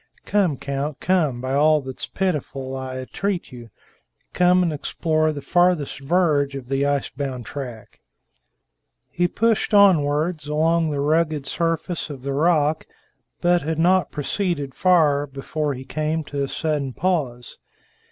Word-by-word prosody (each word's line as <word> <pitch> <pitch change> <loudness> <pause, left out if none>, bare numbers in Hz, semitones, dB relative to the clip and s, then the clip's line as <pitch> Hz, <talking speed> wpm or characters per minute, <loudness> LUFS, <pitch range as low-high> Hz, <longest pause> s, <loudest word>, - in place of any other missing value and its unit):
_ - - -43
Come, 185 -9 +1
count, 140 +2 -4
come! 155 -10 +1
By 130 +1 -3
all 155 +2 +4
that's 130 -2 -6
pitiful, 140 -7 -3
I 130 -1 -5
entreat 180 +8 -3
you, 120 -2 -11 0.6
come 180 0 +4
and 170 -3 0
explore 155 +1 0
the 145 -2 -7
farthest 175 -6 +2
verge 145 -2 +1
of 130 -2 -8
the 135 +1 +1
ice 145 -1 -1
bound 130 -4 -5
track!" 125 -6 -8 1.1
He 175 0 +1
pushed 220 +2 +1
onwards 155 -4 +3
along 160 +2 +2
the 145 -2 -2
rugged 155 -1 +1
surface 165 +2 -2
of 135 -3 -8
the 140 0 -2
rock, 155 0 +2 0.5
but 175 0 +3
had 160 +1 -2
not 180 +3 +3
proceeded 145 -2 -2
far 150 -5 +3
before 140 +2 -3
he 130 +1 -9
came 155 +3 -2
to 145 -1 -4
a - - -2
sudden 145 -3 -2
pause. 140 -10 -2
150 Hz, 145 wpm, -22 LUFS, 140-170 Hz, 1.1 s, all